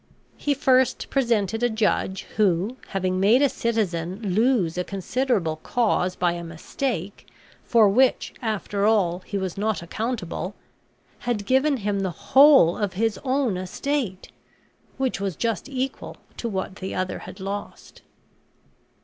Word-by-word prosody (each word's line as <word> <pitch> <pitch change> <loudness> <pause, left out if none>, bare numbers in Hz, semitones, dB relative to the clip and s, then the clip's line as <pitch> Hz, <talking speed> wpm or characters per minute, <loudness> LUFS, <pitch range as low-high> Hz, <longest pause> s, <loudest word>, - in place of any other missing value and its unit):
He 290 -1 0
first 260 -2 +2
presented 225 -5 +1
a 245 - +3
judge 210 -3 0
who, 200 +2 +2
having 185 -1 -1
made 220 +8 +5
a 285 - +4
citizen 195 -4 -2
lose 220 -6 +2
a 180 - -1
considerable 195 -3 -1
cause 185 -1 0
by 175 -1 +1
a 170 0 -5
mistake, 185 +4 -4 0.4
for 225 -3 +5
which, 250 +6 +2
after 210 -3 -1
all, 185 -6 +2
he 200 - -2
was 190 -1 -3
not 215 -3 -1
accountable, 200 -1 -4 0.6
had 235 -4 -2
given 265 +4 +3
him 205 -2 -1
the 190 -4 -5
whole 270 - +7
of 205 -3 -1
his 225 +3 0
own 260 -7 0
estate, 190 +2 -3 0.7
which 265 -6 -1
was 195 -4 -2
just 230 - -2
equal 265 0 -4 0.2
to 235 - -3
what 190 -1 -4
the 190 - -5
other 185 0 -2
had 190 - -10
lost. 200 +2 -7
205 Hz, 140 wpm, -24 LUFS, 185-245 Hz, 0.7 s, whole